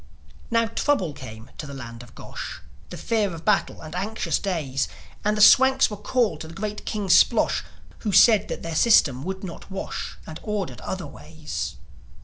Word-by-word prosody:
Now, 230 0 +3
trouble 225 - 0
came 110 -3 -10
to 150 - -5
the 140 - -8
land 115 -3 -8
of 120 - -15
Gosh: - - -7 0.3
The - - -7
fear 210 -6 0
of 165 - -11
battle, 210 -2 +1
and 155 0 -9
anxious 205 +5 -1
days; 150 -9 -1 0.4
And 210 +1 +1
the - - +1
Swanks 265 +3 +7
were - - -3
called 210 -5 0
to 160 - -6
the 165 - -11
great 210 +1 -5
King 210 -2 -2
Splosh, 180 0 +4 0.4
Who 210 - -2
said 210 0 +6
that - - -5
their 165 - -4
system 150 - +4
would 190 +3 -5
not 175 -3 -8
wash, 190 0 -5
And 160 - -8
ordered 195 - -4
other - - -4
ways. - - -6
190 Hz, 180 wpm, -24 LUFS, 155-215 Hz, 0.4 s, Swanks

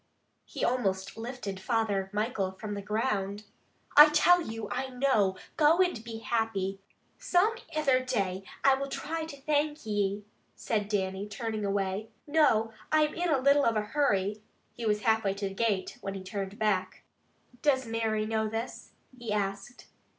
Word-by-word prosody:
He - - -3
almost 195 -6 -1
lifted 225 -4 -5
Father 205 -3 0
Michael 210 -2 -1
from 205 +2 -6
the 200 - -4
ground. 210 -1 -1 0.5
"I 300 +1 +11
tell 350 +4 +5
you, 225 -7 -5
I 265 - -2
know! 245 -8 +2 0.2
Go 310 +2 +5
and 355 -12 +2
be 230 -1 -6
happy!" 220 -5 -1 0.4
"Some 370 +5 +3 0.2
ither 275 -5 +2
day 195 -7 -1 0.2
I 275 - +6
will 275 +1 -2
try 320 +3 -4
to 290 -3 -9
thank 295 0 0
ye," 205 -1 -1 0.3
said 210 -3 -1
Dannie, 195 0 -2
turning 215 +1 -3
away. 200 +1 -1 0.2
"Noo, 285 -8 +3 0.2
I'm 305 -1 +3
in 350 +1 -1
a 295 - +3
little 280 +2 +4
of 230 - +2
a 215 - +2
hurry." 210 -8 +1 0.3
He 230 0 -4
was 210 0 +1
half 220 0 +2
way 195 -1 0
to 200 0 -2
the - - -8
gate 200 -3 -1
when 195 0 -4
he 190 - -6
turned 195 +1 -5
back. 190 -4 -1 0.6
"Does 265 -3 +2
Mary 225 -1 -1
know 220 0 0
this?" 225 +3 -5 0.2
he 240 -3 -6
asked. 200 +3 -3
220 Hz, 165 wpm, -29 LUFS, 200-265 Hz, 0.6 s, I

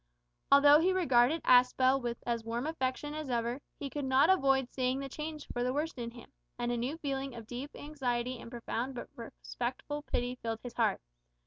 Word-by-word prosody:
Although 285 +1 +8
he 365 +3 +3
regarded 300 -4 +3
Aspel 255 +2 +5
with 240 -1 -3
as 235 -1 -1
warm 230 +3 -3
affection 295 -1 -2
as 305 -2 -5
ever, 240 +2 -1 0.2
he 285 - -3
could 290 +1 -4
not 265 +6 +4
avoid 270 -7 +3
seeing 255 0 0
the 275 0 -4
change 305 +2 -6
for 245 - -1
the 250 +1 0
worse 315 +3 -1
in 235 -3 -5
him, 240 +2 -13 0.3
and 240 0 -1
a - - 0
new 250 +7 -2
feeling 275 -4 -3
of 230 -2 -8
deep 250 +5 -6
anxiety 255 -4 -2
and - - -9
profound 240 +2 -4
but 240 - -6
respectful 250 +4 -5
pity 250 -3 -2
filled 225 -1 -3
his 245 -2 -7
heart. 230 -3 +1
255 Hz, 195 wpm, -32 LUFS, 240-285 Hz, 0.3 s, Although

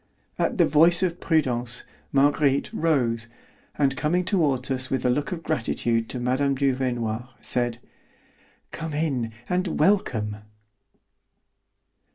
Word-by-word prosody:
At - - 0
the - - +5
voice 165 +4 +5
of 175 -1 -1
Prudence, 125 -6 0 0.3
Marguerite 140 0 +2
rose, 120 -8 0 0.5
and 140 -2 +2
coming 170 +7 0
toward 140 -9 +1
us 130 0 0
with 130 -1 -1
a 125 - +4
look 145 +6 -1
of 170 -2 -5
gratitude 115 -5 -1
to 125 - -4
Mme. 130 +3 +1
Duvernoy, 125 -4 -1
said: 120 -1 -1 0.9
"Come 160 -2 -5
in, 140 -7 -1 0.2
and 180 -1 -1
welcome." 125 - +1
135 Hz, 120 wpm, -25 LUFS, 120-155 Hz, 0.9 s, the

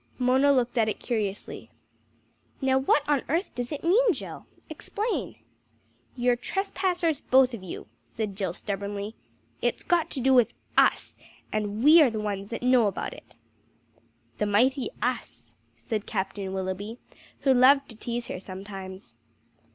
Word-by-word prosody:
Mona 260 +3 +4
looked 250 -2 +1
at 220 -1 +3
it - - -4
curiously. 210 -5 -3 0.9
"Now 265 -1 +2
what 285 +2 +2
on 290 -3 +2
earth 335 +7 0
does 245 -1 -4
it 295 - -5
mean, 420 +6 +4
Jill? - - -8 0.2
Explain." 405 - -3 0.8
"You're 245 0 +2
trespassers 360 +1 -1
both 260 -1 +4
of 230 - -6
you," 185 - -7 0.3
said 215 -3 -3
Jill 190 -3 -2
stubbornly. 200 +1 -4 0.5
"It's - - -1
got 345 -3 +1
to 275 - -4
do 265 +1 +3
with 245 -3 +4 0.2
us, - - +3 0.4
and 210 +1 -2
we 315 +3 +8
are 285 - +6
the 220 -2 -4
ones 200 -1 -3
that 230 - -5
know 250 -3 +5
about 195 - -3
it." - - -16 1.0
"The 210 - +1
mighty 255 - +2
US!" - - -3 0.2
said 215 -3 -4
Captain 195 -1 -3
Willoughby, 190 +4 -4 0.4
who 270 - +4
loved 275 +2 +5
to 225 - -9
tease 235 +2 -4
her - - -5
sometimes. 190 - -9
240 Hz, 150 wpm, -27 LUFS, 205-275 Hz, 1.0 s, we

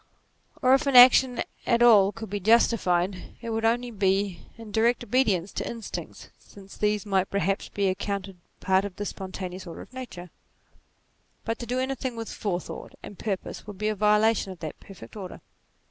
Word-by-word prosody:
Or 255 +1 +6
if 275 +2 +3
action 250 -1 +7
at - - -1
c - - -36
20 - - -2
NATURE 235 +1 +5
all 205 -4 +6
could 220 -1 -9
be 205 - -2
justified, 190 -4 +2
it 230 -1 -6
would 225 0 -2
only 240 +2 +1
be 195 -3 0
when 225 -2 -11
in - - -11
direct 230 +3 +2
obedience 210 -8 +1
to - - -3
instincts, 230 -2 -7
since 195 -1 -15
these 210 0 0
might 195 -2 +1
perhaps 195 0 -1
be 200 -1 0
accounted 195 0 -3 0.2
part 190 +1 +2
of 200 -2 -6
the 205 - -5
spontaneous 185 -1 -6
order 165 - -8
of - - -14
Nature; 185 -10 -8 1.1
but 225 0 -2
to 240 - -6
do 250 +2 -1
anything 260 -1 -2
with 225 -1 -6
forethought 185 -4 -5
and 205 - -10
purpose, 200 -1 -4
would 205 -2 -8
be 210 +2 -1
a 215 - -1
violation 210 0 +2
of 185 - -9
that 155 -2 -6
perfect 165 - -13
order. 190 -4 -8
205 Hz, 190 wpm, -26 LUFS, 190-230 Hz, 1.1 s, action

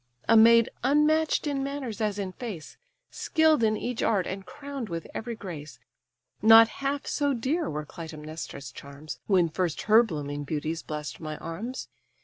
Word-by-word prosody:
A 230 - +5
maid, 230 +1 +7 0.2
unmatch'd 300 +4 +3
in 280 -2 -1
manners 270 -6 -4
as 210 -2 0
in 195 -2 -3
face, 195 -7 -7 0.4
Skill'd 315 -4 +2
in 215 -1 +2
each 245 +1 -3
art, 195 -5 +2
and 190 +1 -5
crown'd 280 -5 -7
with 165 -1 -4
every 235 +1 -4
grace; 165 -8 -8 0.6
Not 225 +1 +9
half 280 +1 -3
so 285 -2 0
dear 285 +8 -1
were 150 0 -4
Clytæmnestra's 155 -4 -8
charms, 140 +3 -9
When 185 -4 +4
first 165 0 -2
her 220 +2 +7
blooming 145 -8 -4
beauties 155 +2 -3
bless'd 150 -3 -6
my 155 -2 -5
arms. 230 +10 -6
215 Hz, 155 wpm, -27 LUFS, 155-260 Hz, 0.6 s, Not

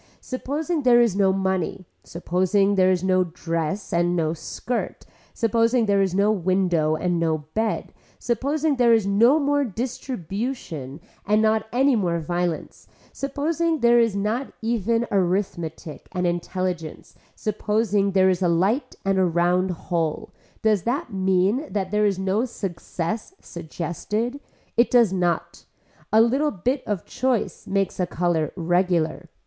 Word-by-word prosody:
Supposing 295 +5 -3
there 245 -2 +5
is 235 -5 +3
no 195 -1 +3
money, 190 -1 -1 0.2
supposing 185 +4 +1
there 185 -1 +4
is 185 -1 +1
no 185 -1 +3
dress 165 +1 -3
and 175 +1 +2
no 160 -2 0
skirt, 230 +8 -4 0.3
supposing 230 +1 +2
there 200 -1 +2
is 190 -2 0
no 200 +2 +3
window 180 -5 +1
and 175 +1 -1
no 160 -2 0
bed, 220 0 -2 0.2
supposing 280 +5 0
there 240 -2 +5
is 220 -3 +1
no 230 +8 +4
more 285 0 +1
distribution 215 - -5 0.2
and 210 +1 +2
not 220 0 +2
any 265 +2 +3
more 175 -6 0
violence, 175 0 -3 0.3
supposing 315 +3 -1
there 240 0 +5
is 230 -3 +2
not 215 +6 -2
even 230 +1 0
arithmetic 175 -4 -2
and 180 -1 -1
intelligence, 175 -1 -3 0.2
supposing 210 -1 0
there 190 -1 +4
is 185 0 -2
a 180 - +3
light 195 - +1
and 195 -1 +2
a - - +4
round 175 +2 +2
hole, 165 -2 -3 0.3
does 215 -3 +3
that 245 - -2
mean 190 +8 +1
that 195 -2 -2
there 210 0 +3
is 195 -2 0
no 190 +4 0
success 210 - -5
suggested. 175 - -4 0.4
It 235 - +4
does 235 -6 +4
not. 175 -2 -1 0.5
A 220 - +6
little 265 +6 +2
bit 255 +6 -1
of 200 -5 -2
choice 245 -8 -2
makes 195 -1 -1
a 180 - +1
color 170 -4 0
regular. 175 -2 0
195 Hz, 145 wpm, -23 LUFS, 175-235 Hz, 0.5 s, A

